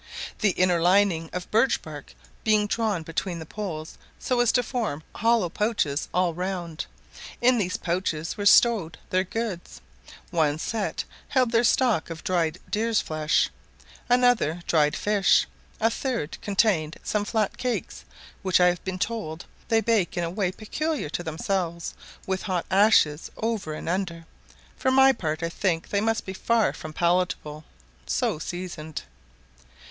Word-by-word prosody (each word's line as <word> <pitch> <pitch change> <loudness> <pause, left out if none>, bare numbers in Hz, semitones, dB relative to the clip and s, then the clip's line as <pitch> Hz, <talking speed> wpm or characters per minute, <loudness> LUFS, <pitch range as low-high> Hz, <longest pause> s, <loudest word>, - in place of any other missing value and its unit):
the 210 - +3
inner 180 -2 +3
lining 180 -2 +3
of 180 0 -6
birch 230 +4 +3
bark 150 -3 -10 0.3
being 215 -1 +3
drawn 210 -5 -1
between 170 +2 -3
the 160 - -7
poles 160 -4 -6 0.2
so 250 -1 -1
as 240 -1 +4
to 245 - +2
form 220 - -3
hollow 230 -3 +2
pouches 170 -7 -1
all 180 -1 +1
round; 175 -2 -4 0.5
in 245 0 +4
these 185 -3 -1
pouches 170 -2 -2
were 205 -1 0
stowed 200 -9 +5
their 185 0 +3
goods; 195 - -5 0.5
one 155 -4 +2
set 215 +6 -2 0.2
held 255 -4 +2
their 230 0 +3
stock 240 -8 +2
of 165 -1 -7
dried 170 -2 0
deer's 225 +1 +2
flesh, 155 0 +1 0.6
another 245 -10 +3
dried 150 -2 +3
fish, 205 -2 +3 0.3
a 225 +1 +3
third 235 - -2
contained 190 -6 +1
some 210 -1 0
flat 215 -1 0
cakes, 250 -2 -3 0.4
which 185 -2 +3
I 180 0 +6
have 175 -1 -3
been 190 -1 -3
told 185 -6 -3 0.2
they 225 -2 +3
bake 215 -6 +1
in 175 - +1
a 165 - -2
way 190 -1 0
peculiar 290 - -3
to 170 - -3
themselves, 170 +1 -2 0.3
with 190 -1 -1
hot 185 -4 -2
ashes 190 -7 +4
over 220 -9 -2
and - - -7
under; 170 -2 -2 0.5
for 260 - 0
my 265 +1 +6
part 160 -8 -3
I 165 - 0
think 170 -1 -1
they 200 - +1
must 225 +1 0
be 190 - -5
far 230 +3 +2
from 155 - -8
palatable 170 -3 0 0.4
so 65 - 0
seasoned. 170 -3 -6
185 Hz, 150 wpm, -26 LUFS, 165-220 Hz, 0.6 s, I